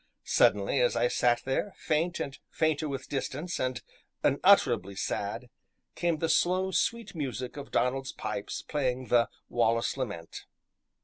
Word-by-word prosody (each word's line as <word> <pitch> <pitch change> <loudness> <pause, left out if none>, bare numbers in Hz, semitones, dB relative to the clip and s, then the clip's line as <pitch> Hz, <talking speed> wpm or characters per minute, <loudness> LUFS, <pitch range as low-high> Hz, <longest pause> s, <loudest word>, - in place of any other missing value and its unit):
Suddenly, - - +3
as - - +3
I - - +3
sat 120 - +2
there, 135 +9 -1
faint 165 +3 0
and 135 - -4
fainter 155 -1 0
with 135 -1 -5
distance, 145 +5 -3
and 130 -1 -2 0.4
unutterably 130 - +4
sad, 105 +4 -3 0.4
came 170 -2 0
the 165 - 0
slow, 185 +3 +2
sweet 230 +2 0
music 130 -6 -4
of 145 -1 -7
Donald's 135 +1 0
pipes 100 - -4
playing 130 -3 -2
the 120 -1 +4 0.2
"Wallace 115 +1 +1
Lament." 100 -11 -5
135 Hz, 135 wpm, -29 LUFS, 125-165 Hz, 0.4 s, unutterably